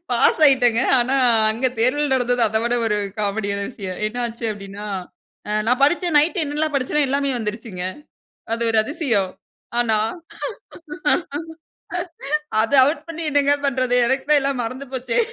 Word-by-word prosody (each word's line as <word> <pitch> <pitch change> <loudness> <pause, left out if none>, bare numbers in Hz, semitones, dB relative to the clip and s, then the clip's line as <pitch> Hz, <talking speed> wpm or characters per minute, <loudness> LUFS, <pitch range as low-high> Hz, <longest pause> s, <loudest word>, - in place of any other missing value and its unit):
Pass 245 +5 +3
ஆயிட்டேங்க. 245 -4 +4 0.2
ஆனா, 250 +3 +1 0.4
அங்க 230 +4 0
தேர்தல் 275 +4 +1
நடந்தது 245 -1 +1
அத 220 - -2
விட 240 - +1
ஒரு 210 -1 +1 0.2
காமெடியான 200 -1 -1
விஷயம். 190 -6 -7
என்ன 215 +3 -6
ஆச்சு 235 0 -6
அப்படினா, 200 0 -7 0.8
நான் 250 +2 +2
படிச்சேன் 345 +2 +1
நைட் 340 +5 +2
என்னெல்லாம் 300 +1 -2
படிச்சேனோ 280 +2 +2
எல்லாமே 280 +1 0
வந்துருச்சுங்க. 210 -4 -5 0.7
அது 230 - -3
ஒரு 225 - +1
அதிசயம். 235 - 0 0.5
ஆனா 225 -3 +2 2.6
அது 225 +5 0
ஆவுட் 290 +5 +1
பண்ணி 330 0 -6
என்னங்க 285 0 +3
பண்றது? 255 -2 0
எனக்கு 265 +2 0
தான் 295 -1 +6
எல்லாமே 275 -2 -1
மறந்து 255 +4 -6
போச்சே. 250 -2 -1
250 Hz, 135 wpm, -21 LUFS, 220-280 Hz, 2.6 s, தான்